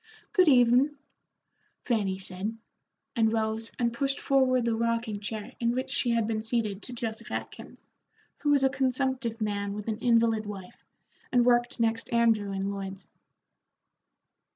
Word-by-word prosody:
"Good 370 Hz, -4 st, +5 dB
evenin'," 255 Hz, +2 st, +5 dB, 0.9 s
Fanny 205 Hz, -6 st, 0 dB
said, 190 Hz, +4 st, -5 dB, 0.6 s
and 225 Hz, -2 st, +3 dB
rose 220 Hz, 0 st, -1 dB
and 235 Hz, -1 st, 0 dB
pushed 275 Hz, +3 st, -1 dB
forward 255 Hz, -3 st, +2 dB
the 235 Hz, -, +1 dB
rocking 230 Hz, -2 st, -1 dB
chair 215 Hz, +3 st, -5 dB
in 235 Hz, -1 st, +1 dB
which 255 Hz, -, -2 dB
she 245 Hz, -, +1 dB
had 230 Hz, -2 st, +2 dB
been 215 Hz, 0 st, -1 dB
seated 220 Hz, -3 st, -2 dB
to 250 Hz, -, -7 dB
Joseph 225 Hz, -2 st, -5 dB
Atkins, -, -, -7 dB, 0.5 s
who 295 Hz, -, -1 dB
was 285 Hz, -2 st, +4 dB
a 265 Hz, -, +5 dB
consumptive 260 Hz, -3 st, -1 dB
man 200 Hz, -2 st, -2 dB
with 210 Hz, +1 st, -6 dB
an 220 Hz, -1 st, -2 dB
invalid 230 Hz, -3 st, +2 dB
wife, 195 Hz, -3 st, -9 dB, 0.5 s
and 245 Hz, -2 st, +4 dB
worked 240 Hz, 0 st, +2 dB
next 225 Hz, 0 st, 0 dB
Andrew 225 Hz, -4 st, +2 dB
in 195 Hz, 0 st, -2 dB
Lloyd's. 195 Hz, -1 st, -7 dB
230 Hz, 150 wpm, -28 LUFS, 215-245 Hz, 0.9 s, Good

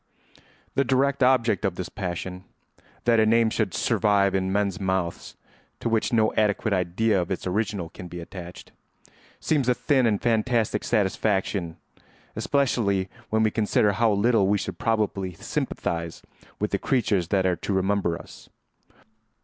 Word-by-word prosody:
The 135 Hz, -, +2 dB
direct 135 Hz, +2 st, +1 dB
object 125 Hz, -4 st, +3 dB
of 95 Hz, -4 st, 0 dB
this 90 Hz, -, -4 dB
passion—that 95 Hz, +5 st, -4 dB
a -, -, +5 dB
name 115 Hz, 0 st, +3 dB
should 105 Hz, -6 st, -1 dB
survive 100 Hz, -2 st, +2 dB
in 95 Hz, -1 st, 0 dB
men's 100 Hz, -2 st, 0 dB
mouths 95 Hz, -3 st, -2 dB, 0.4 s
to -, -, -2 dB
which 110 Hz, -1 st, +1 dB
no 110 Hz, -2 st, +2 dB
adequate 105 Hz, 0 st, +1 dB
idea 95 Hz, +3 st, +1 dB
of 85 Hz, -, -5 dB
its 95 Hz, -, -3 dB
original 95 Hz, -2 st, -2 dB
can 90 Hz, -, -9 dB
be 90 Hz, 0 st, -8 dB
attached—seems 95 Hz, -, -6 dB
a 125 Hz, -, +3 dB
thin 130 Hz, -4 st, +2 dB
and 105 Hz, -3 st, +1 dB
fantastic 115 Hz, -1 st, +1 dB
satisfaction, 95 Hz, -4 st, 0 dB, 0.6 s
especially 105 Hz, -9 st, +1 dB, 0.2 s
when 110 Hz, 0 st, +2 dB
we 110 Hz, -, +2 dB
consider 105 Hz, -1 st, +2 dB
how 110 Hz, +2 st, +2 dB
little 105 Hz, 0 st, +3 dB
we 105 Hz, +1 st, +3 dB
should 95 Hz, -2 st, -5 dB
probably 105 Hz, -5 st, -1 dB
sympathise 85 Hz, 0 st, -4 dB, 0.3 s
with 105 Hz, -, -2 dB
the 100 Hz, -, 0 dB
creatures 105 Hz, -, +1 dB
that 95 Hz, 0 st, +1 dB
are 90 Hz, -2 st, +1 dB
to -, -, -4 dB
remember 95 Hz, -2 st, 0 dB
us. -, -, -14 dB
100 Hz, 145 wpm, -25 LUFS, 95-115 Hz, 0.6 s, a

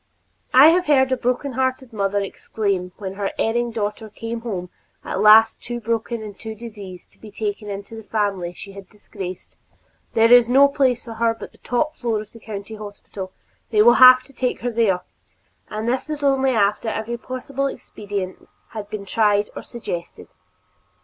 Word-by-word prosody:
I 270 Hz, +5 st, +9 dB
have 355 Hz, +1 st, +2 dB
heard 265 Hz, -3 st, +4 dB
a -, -, +4 dB
broken 250 Hz, +3 st, -1 dB
hearted 260 Hz, -1 st, -2 dB
mother 200 Hz, -1 st, 0 dB
exclaim 195 Hz, -2 st, -3 dB
when 190 Hz, -2 st, -5 dB
her 195 Hz, 0 st, -3 dB
erring 240 Hz, +2 st, 0 dB
daughter 215 Hz, -1 st, -4 dB
came 230 Hz, +2 st, -6 dB
home 185 Hz, -7 st, -5 dB, 0.3 s
at -, -, -3 dB
last 220 Hz, +1 st, +7 dB
too 240 Hz, 0 st, -5 dB
broken 230 Hz, 0 st, -2 dB
and 210 Hz, -2 st, -8 dB
diseased 210 Hz, -4 st, -9 dB
to -, -, -26 dB
be 220 Hz, -, -11 dB
taken 210 Hz, 0 st, -4 dB
into 200 Hz, +2 st, -7 dB
the 220 Hz, -, -8 dB
family 200 Hz, -5 st, -1 dB
she 195 Hz, +3 st, -11 dB
had 195 Hz, -1 st, -12 dB
disgraced, 190 Hz, -3 st, -9 dB, 0.6 s
"There 230 Hz, +1 st, +6 dB
is 240 Hz, -1 st, +7 dB
no 275 Hz, +3 st, +7 dB
place 260 Hz, -4 st, +1 dB
for 230 Hz, -, -7 dB
her 230 Hz, 0 st, +1 dB
but -, -, -10 dB
the -, -, -24 dB
top 305 Hz, +6 st, -1 dB
floor 230 Hz, -3 st, -1 dB
of 215 Hz, 0 st, -9 dB
the 230 Hz, -, -14 dB
County 210 Hz, -1 st, -7 dB
Hospital; 205 Hz, -2 st, -8 dB, 0.4 s
they 210 Hz, -2 st, +4 dB
will 240 Hz, +2 st, +7 dB
have 255 Hz, 0 st, +10 dB
to 275 Hz, -, -20 dB
take 250 Hz, -1 st, -2 dB
her 245 Hz, -, -1 dB
there," 215 Hz, -6 st, +2 dB, 0.7 s
and 215 Hz, +1 st, -4 dB
this 290 Hz, +4 st, -2 dB
only 270 Hz, -1 st, +3 dB
after 210 Hz, -1 st, +1 dB
every 220 Hz, +2 st, -3 dB
possible 265 Hz, +2 st, -3 dB
expedient 200 Hz, -7 st, -6 dB, 0.2 s
had 210 Hz, -2 st, -7 dB
been 205 Hz, -2 st, -6 dB
tried 205 Hz, 0 st, +2 dB
or -, -, -5 dB
suggested. 180 Hz, -8 st, -7 dB
225 Hz, 175 wpm, -22 LUFS, 205-245 Hz, 0.7 s, have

